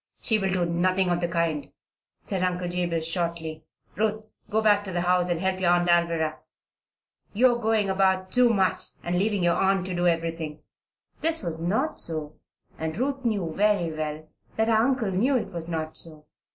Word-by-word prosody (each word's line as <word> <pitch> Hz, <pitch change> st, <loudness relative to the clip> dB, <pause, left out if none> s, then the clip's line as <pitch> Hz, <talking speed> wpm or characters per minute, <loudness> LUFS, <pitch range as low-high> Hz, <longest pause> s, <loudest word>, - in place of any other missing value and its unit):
"She 220 Hz, -3 st, +2 dB
will 195 Hz, -1 st, 0 dB
do 180 Hz, -1 st, +1 dB
nothing 180 Hz, +2 st, +1 dB
of 175 Hz, 0 st, 0 dB
the 175 Hz, -, +1 dB
kind," 170 Hz, -3 st, -1 dB, 0.5 s
said 190 Hz, -2 st, -3 dB
Uncle 180 Hz, -1 st, -1 dB
Jabez, 175 Hz, -2 st, -1 dB
shortly. 165 Hz, -2 st, -3 dB, 0.3 s
"Ruth, 215 Hz, +1 st, -1 dB, 0.2 s
go 215 Hz, -, +2 dB
back 205 Hz, -2 st, +4 dB
to 190 Hz, -, -5 dB
the 175 Hz, -1 st, -1 dB
house 180 Hz, 0 st, +2 dB
and 170 Hz, -2 st, 0 dB
help 190 Hz, +1 st, 0 dB
your 180 Hz, -2 st, +2 dB
Aunt 175 Hz, 0 st, +3 dB
Alvirah. 170 Hz, -2 st, +2 dB, 0.9 s
You 245 Hz, +4 st, +5 dB
are 240 Hz, -, -3 dB
going 220 Hz, -2 st, +2 dB
about 190 Hz, -1 st, +1 dB
too 250 Hz, -1 st, +5 dB
much 195 Hz, -4 st, +2 dB, 0.2 s
and 175 Hz, +1 st, 0 dB
leaving 205 Hz, -1 st, +1 dB
your 175 Hz, 0 st, +4 dB
aunt 195 Hz, -1 st, +2 dB
to 185 Hz, -, -4 dB
do 175 Hz, 0 st, +1 dB
everything." 165 Hz, -2 st, -2 dB, 0.6 s
This 325 Hz, -4 st, +1 dB
was 165 Hz, -2 st, -4 dB
not 210 Hz, -, 0 dB
so, 155 Hz, -2 st, -3 dB, 0.5 s
and 160 Hz, +1 st, -3 dB
Ruth 270 Hz, +2 st, -2 dB
knew 200 Hz, -9 st, -1 dB
very 200 Hz, -5 st, +2 dB
well 155 Hz, 0 st, -4 dB, 0.3 s
that 220 Hz, +1 st, +1 dB
her -, -, +4 dB
uncle 230 Hz, -1 st, +2 dB
knew 250 Hz, +9 st, +2 dB
it 225 Hz, -, -4 dB
was 170 Hz, -1 st, -5 dB
not 160 Hz, -1 st, -3 dB
so. 155 Hz, -2 st, -4 dB
180 Hz, 190 wpm, -26 LUFS, 170-210 Hz, 0.9 s, You